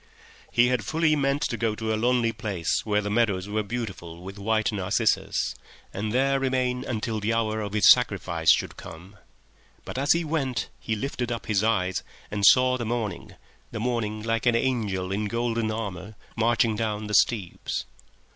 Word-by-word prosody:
He - - -31
walked - - -26
away. - - -25
He - - +4
had 125 -3 0
fully 155 +6 +2
meant 140 0 0
to - - -1
go 115 -2 0
to 110 0 -2
a - - +2
lonely 120 +1 +2
place 105 -7 -2
where 105 -1 +1
the 105 - -3
meadows 105 -4 +1
were 105 +1 -1
beautiful 95 -6 -6
with 95 +2 -8
white 110 +2 +1
narcissus, 95 -3 0 0.4
and 105 +2 -3
there 135 +3 +2
remain 130 -1 0
until 115 -2 -2
the 110 +2 0
hour 110 -1 0
of 100 -1 -5
his 105 -4 +4
sacrifice - - +3
should - - 0
come, 90 +5 -11 0.7
but - - -5
as 140 +2 +4
he 170 0 0
walked 150 -5 -2
he 110 - -2
lifted 120 +1 -3
up 115 -2 -4
his 105 -1 +1
eyes 95 -5 +1 0.3
and 100 -1 +3
saw 130 0 +6
the - - -2
morning, 110 -6 -4 0.3
the 115 - -6
morning 110 -3 -2
like 115 0 0
an 120 - +4
angel 105 -7 -1
in 105 +2 -1
golden 115 0 -1
armour, 105 -2 -5 0.2
marching 115 0 +2
down 110 -1 -2
the 105 - -5
steeps 100 -2 +1
110 Hz, 185 wpm, -26 LUFS, 105-120 Hz, 0.7 s, saw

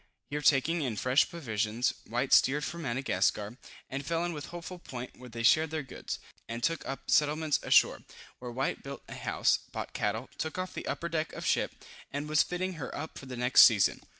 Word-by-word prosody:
Here 150 +1 -2
taking 150 +4 +3
in 125 -6 -1
fresh 125 +6 +3
provisions, 115 - -1
White 120 +4 0
steered 145 +3 +5
for 170 - -4
Madagascar, 120 - 0 0.3
and 135 +1 -4
fell 165 +3 -1
in 175 - -2
with 150 -1 -6
Hopeful 175 +1 -8
Point 125 -6 -8
where 125 0 -12
they 115 0 -5
shared 155 +6 +5
their 155 -1 -3
goods, 130 - -6 0.3
and 115 +1 -5
took 165 +1 +1
up 135 0 -5
settlements 150 -1 +3
ashore, - - +4 0.4
where 125 - -6
White 130 +3 -2
built 140 0 -8
a - - -8
house, - - +1
bought - - -5
cattle, 110 +4 -1
took 160 +1 -3
off 185 0 -3
the - - -6
upper 170 - -2
deck 160 -1 -2
of - - -6
ship, - - +1 0.4
and 145 +2 -3
was 155 0 +4
fitting 185 +1 -2
her - - -4
up 155 +2 -6
for 135 - -11
the 125 -1 -6
next 125 +2 +6
season. 105 -5 +3
140 Hz, 205 wpm, -30 LUFS, 125-160 Hz, 0.4 s, next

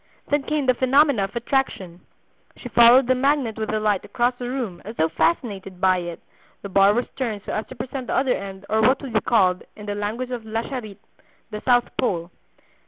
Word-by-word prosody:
Then 290 0 +2
came 300 0 -1
the 255 - +4
phenomena 260 -3 +3
of 195 - -11
attraction. 235 -8 -2 0.6
She 245 - -8
followed 240 +3 +7
the 255 - +3
magnet 265 -3 +1
with 220 -1 -4
delight 215 -2 0
across 240 +4 0
the 245 -1 -4
room, 240 -9 -4
as 220 +4 -8
though 160 -4 +1
fascinated 195 - -1
by 185 -1 +3
it; 175 -1 -6 0.4
the 200 - -6
bar 195 +2 +4
was 245 - 0
turned 225 -6 -3
so - - -4
as 215 - -3
to 260 - -10
present 255 +1 -6
the - - -1
other 265 -1 +2
end 195 0 -7
or 220 +1 +1
what 255 +5 +4
would 260 -4 -6
be 215 - +2
called, 185 -6 +2
in 210 - -10
the 205 - -3
language 215 +5 -4
of 240 -2 -4
La 220 +1 -3
Charite, 225 -8 -6 0.5
the 210 0 -5
south 245 -1 +2
pole. 175 -6 -1
225 Hz, 210 wpm, -23 LUFS, 200-255 Hz, 0.6 s, followed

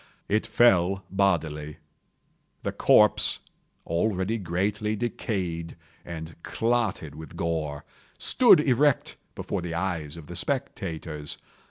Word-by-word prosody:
It 105 +2 +1
fell 95 -4 +3
bodily. 80 -6 0 0.9
The - - -1
corpse, - - +4 0.5
already 95 +5 0
greatly 100 +4 -1
decayed 95 -7 -3 0.3
and 80 -1 -7
clotted 115 -11 -1
with 80 0 -10
gore, 75 -3 -2 0.3
stood 245 -10 +6
erect 140 0 +2 0.2
before 100 - -3
the 85 -1 -4
eyes 85 -4 -3
of 80 - -10
the 90 - -8
spectators. 80 - -3
90 Hz, 105 wpm, -26 LUFS, 80-105 Hz, 0.9 s, stood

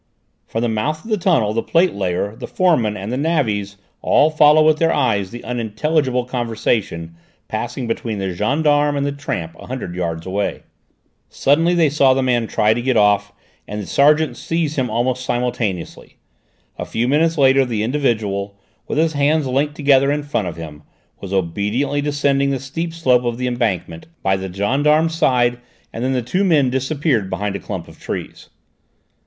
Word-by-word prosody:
From 115 - -3
the - - +1
mouth 130 +8 -2
of 225 - -8
the 215 - +2
tunnel 150 - +2
the 115 - 0
plate 170 +5 +2
layer, 100 +2 -2
the - - -7
foreman 125 - +1
and 100 +3 -5
the 125 - -1
navvies 110 -11 -1 0.2
all 155 - +3
followed 155 0 +5
with 155 -1 +4
their 165 0 +3
eyes 100 -6 +1
the 120 +3 -9
unintelligible 125 +3 -1
conversation 110 -9 -2 0.3
passing 120 +3 -4
between 115 -1 -3
the 95 -2 -3
gendarme 145 - +1
and 140 - 0
the 145 - -1
tramp 85 - -5
a - - -11
hundred 125 -9 -5
yards 85 -2 -3
away. 100 +2 -2 0.7
Suddenly 165 +5 +2
they 165 -2 +4
saw 135 -3 +4
the 135 - +1
man 120 -3 +1
try 110 0 +2
to 120 - -3
get 130 -1 +1
off 105 -1 +3 0.4
and 105 +1 -5
the 105 - -5
sergeant 150 +6 +3
seize 165 -2 -2
him 130 -3 -1
almost 125 +3 -1
simultaneously. 120 -8 -3 0.6
A - - -3
few 115 +2 -1
minutes 160 +4 +2
later 135 -1 +5
the 115 -4 -2
individual, 110 -6 -1 0.3
with - - -3
his 160 0 +2
hands 145 +1 +2
linked 140 +3 0
together 140 -2 +3
in 145 0 -1
front 130 -9 -2
of 85 - -6
him, 75 -3 -9 0.4
was 95 - -8
obediently 105 +10 -1
descending 140 -1 +1
the 135 -1 -1
steep 165 +6 -4
slope 130 -7 +2
of 120 -1 -2
the 125 - -2
embankment, 110 - -2 0.2
by 95 0 +2
the 95 -1 -5
gendarme's 145 - +2
side, 125 -6 +2 0.3
and 115 - -4
then 130 +1 0
the 125 -2 -1
two 180 - 0
men 150 -9 +3
disappeared 130 - 0
behind 100 0 -3
a - - -3
clump - - -6
of - - -15
trees. - - -6
125 Hz, 180 wpm, -19 LUFS, 105-145 Hz, 0.7 s, followed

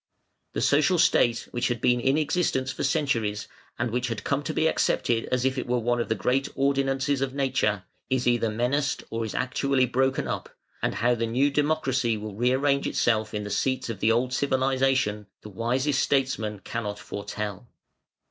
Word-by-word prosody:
The - - -2
social - - +3
state 120 -1 +3
which 120 - 0
had 120 -2 -2
been 125 +2 +3
in 135 +4 +2
existence 155 -4 0
for - - -5
centuries, 115 -9 0 0.3
and 120 -1 -1
which 125 +1 -1
had 115 -4 -4
come 140 0 0
to 145 - -3
be 160 - 0
accepted 120 -6 +1
as 125 0 -1
if 130 0 +1
it - - -5
were 125 0 +1
one 120 +1 0
of - - -4
the - - +1
great 135 +2 0
ordinances 135 0 +1
of 135 0 -2
nature, 130 -8 0 0.3
is 130 -1 0
either 120 -2 +2
menaced 125 +5 0
or 115 0 -2
is 110 - -6
actually 130 0 +1
broken 130 +1 0
up, - - -5 0.2
and - - -1
how 120 +2 +2
the 115 -1 -1
new 135 +5 +2
democracy 135 -6 +1
will 105 0 -6
rearrange 130 +5 +1
itself 110 -2 +1
in 105 - -2
the 105 - -6
seats 130 0 -1
of 105 - -7
the 110 - +3
old 125 +2 +1
civilisation 130 -6 +1
the 105 - -10
wisest 130 +7 0
statesman 110 -7 0
cannot 105 -3 -4
foretell. 105 +2 -6
125 Hz, 185 wpm, -26 LUFS, 115-135 Hz, 0.3 s, social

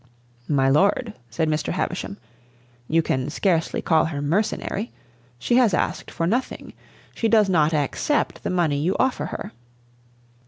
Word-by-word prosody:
"My 135 -3 +3
lord," 200 - +2 0.2
said 155 +7 -1
Mr. 155 0 -1
Havisham, 185 +2 -3 0.7
"you 165 +1 +2
can 130 -1 -1
scarcely 165 0 0
call 160 -2 +3
her 155 -3 -3
mercenary. 200 +7 -1 0.5
She 240 - +1
has 235 -7 +4
asked - - -2
for 165 - -2
nothing. 235 +9 -2 0.4
She 225 - 0
does 220 -2 +4
not 160 -4 +3
accept 155 - 0
the - - -3
money 165 -6 +1
you 175 +6 0
offer 260 0 +1
her." - - -6
170 Hz, 145 wpm, -23 LUFS, 150-210 Hz, 0.7 s, has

